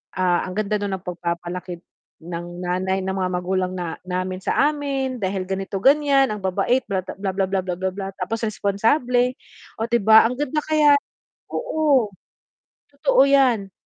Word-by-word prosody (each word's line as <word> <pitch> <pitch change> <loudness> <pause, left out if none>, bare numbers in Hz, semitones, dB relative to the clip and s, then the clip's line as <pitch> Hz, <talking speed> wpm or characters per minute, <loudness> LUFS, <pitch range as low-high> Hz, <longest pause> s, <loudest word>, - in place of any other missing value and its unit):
ah, 180 -1 +2
ang - - -5
ganda 215 0 0
daw 205 0 -2
ng 190 - -2
pagpapalaki 175 0 -4 0.4
ng 175 +1 -7
nanay, 185 +2 -1
ng 190 0 -3
mga 185 -1 -1
magulang 185 +1 -1
na 175 -3 -4
namin 185 0 -3
sa - - 0 0.2
amin, 275 -3 -2
dahil 190 -1 -2
ganito 195 0 -3
ganiyan, 275 +3 +4
ang 210 - -4
babait 240 +7 +1
bla 190 - +1
bla, 185 - -8
bla, 195 -1 -2
bla, 190 0 0
bla, 180 -1 -3
bla, 190 - -1
bla 195 +1 -6
tapos 225 +5 -3
responsable, 240 +5 +1 0.5
oh, 225 - -1
'di 235 0 +2
ba 220 +2 +7
ang 250 - -4
ganda 295 +1 0
kaya 305 -2 +5 0.6
oo. 310 - +1 0.8
Totoo 290 - +3
yan. 250 -8 +3
195 Hz, 165 wpm, -22 LUFS, 185-255 Hz, 0.8 s, ba